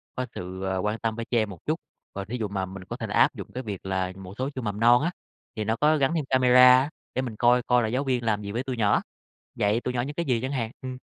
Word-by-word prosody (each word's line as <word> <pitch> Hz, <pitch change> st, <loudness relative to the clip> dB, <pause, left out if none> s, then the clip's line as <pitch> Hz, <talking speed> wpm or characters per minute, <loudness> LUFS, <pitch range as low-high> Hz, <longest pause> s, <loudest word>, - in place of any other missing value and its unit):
có 130 Hz, -, -2 dB
sự, 95 Hz, +1 st, -6 dB
à, 95 Hz, 0 st, -1 dB
quan 105 Hz, +4 st, -1 dB
tâm 115 Hz, -1 st, -1 dB
với 115 Hz, 0 st, -4 dB
trẻ 120 Hz, -, 0 dB
em 110 Hz, -2 st, 0 dB
một 90 Hz, -5 st, -9 dB
chút. -, -, 0 dB, 0.3 s
Còn 100 Hz, -1 st, -5 dB
thí 125 Hz, +4 st, -3 dB
dụ 110 Hz, -3 st, -2 dB
mà 95 Hz, -1 st, -2 dB
mình 95 Hz, 0 st, -9 dB
có -, -, -7 dB
thể -, -, -4 dB
là -, -, -3 dB
áp -, -, +5 dB
dụng -, -, -8 dB
cái 130 Hz, -, -4 dB
việc 100 Hz, -5 st, -6 dB
là 95 Hz, -1 st, -1 dB
một 95 Hz, 0 st, -10 dB
số 130 Hz, +2 st, -1 dB
trường 130 Hz, -, -4 dB
mầm 105 Hz, -2 st, -3 dB
non 120 Hz, +2 st, +6 dB
á, 170 Hz, -, 0 dB, 0.4 s
thì 110 Hz, -, -2 dB
nó 110 Hz, +2 st, 0 dB
có 150 Hz, +5 st, +3 dB
gắn 135 Hz, +2 st, +2 dB
thêm 155 Hz, -4 st, -1 dB
camera 125 Hz, 0 st, +7 dB
á, 135 Hz, +3 st, -1 dB, 0.3 s
để 130 Hz, -, +1 dB
mình 120 Hz, -4 st, -5 dB
coi 120 Hz, +2 st, +4 dB
coi 125 Hz, 0 st, +3 dB
là -, -, 0 dB
giáo 125 Hz, +5 st, 0 dB
viên 125 Hz, -3 st, 0 dB
làm 105 Hz, -2 st, 0 dB
gì 100 Hz, -1 st, -5 dB
với 120 Hz, +4 st, -2 dB
tụi 130 Hz, -2 st, -4 dB
nhỏ, 105 Hz, -3 st, +3 dB, 0.5 s
dạy 105 Hz, +3 st, +1 dB
tụi 125 Hz, -, -3 dB
nhỏ 120 Hz, -, 0 dB
những 145 Hz, +4 st, -5 dB
cái 170 Hz, -, -2 dB
gì 125 Hz, -5 st, +1 dB
chẳng 130 Hz, +2 st, -3 dB
hạn, 115 Hz, -5 st, -2 dB
ừm. 130 Hz, -1 st, -6 dB
115 Hz, 310 wpm, -26 LUFS, 100-130 Hz, 0.5 s, camera